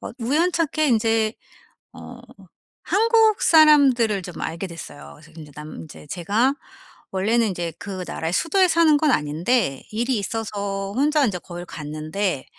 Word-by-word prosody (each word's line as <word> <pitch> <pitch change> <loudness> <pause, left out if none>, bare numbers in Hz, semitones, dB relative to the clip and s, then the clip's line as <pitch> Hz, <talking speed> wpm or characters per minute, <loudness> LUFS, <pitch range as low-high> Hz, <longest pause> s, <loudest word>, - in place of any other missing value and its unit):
어 - - -7
우연찮게 310 +4 0
인제 225 -1 +1 0.6
어 - - -11 0.6
한국 450 +1 +3
사람들을 270 - +5
좀 180 0 -9
알게 165 +4 -4
됐어요. 75 - -10
그래서 - - -18
인제 150 -2 -11
남 150 +1 -9
인제 155 -1 -13
제가 210 - 0 0.6
원래는 220 +4 +1
인제 175 -3 -4
그 190 -2 -6
나라의 160 +1 -4
수도에 370 - +2
사는 330 -2 +4
건 305 -2 +2
아닌데 155 - 0
일이 235 +3 -1
있어서 200 -2 -4
혼자 300 +2 +2
인제 195 -6 -2
거길 175 0 -9
갔는데 155 +1 -4
215 Hz, 295 characters per minute, -22 LUFS, 175-285 Hz, 0.6 s, 사람들을